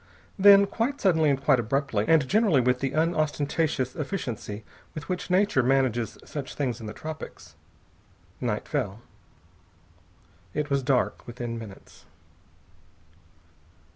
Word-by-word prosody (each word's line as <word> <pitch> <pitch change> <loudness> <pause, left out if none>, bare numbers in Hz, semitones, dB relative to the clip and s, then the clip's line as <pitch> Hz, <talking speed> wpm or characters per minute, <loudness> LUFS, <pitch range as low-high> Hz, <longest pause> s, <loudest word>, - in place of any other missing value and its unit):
Then, 200 0 +8
quite 240 +7 -2
suddenly 160 -6 +3
and 135 -2 +1
quite 135 -2 +3
abruptly, 120 -2 0
and 160 -5 +4
generally 205 - +3
with 125 0 +2
the 135 0 -2
unostentatious 155 -4 0
efficiency 120 - -5 0.3
with 155 -2 -7
which 180 0 -3
Nature 185 -5 +3
manages 125 -3 +1
such 140 -3 -6
things 125 -5 -2
in 110 - -7
the - - -5
tropics, 155 +4 -9 0.8
night - - -2
fell. 100 +4 -2 1.5
It 150 -1 -2
was 140 0 +2
dark 130 -1 0
within 120 -1 -5
minutes. 105 -4 -12
140 Hz, 120 wpm, -26 LUFS, 125-165 Hz, 1.5 s, Then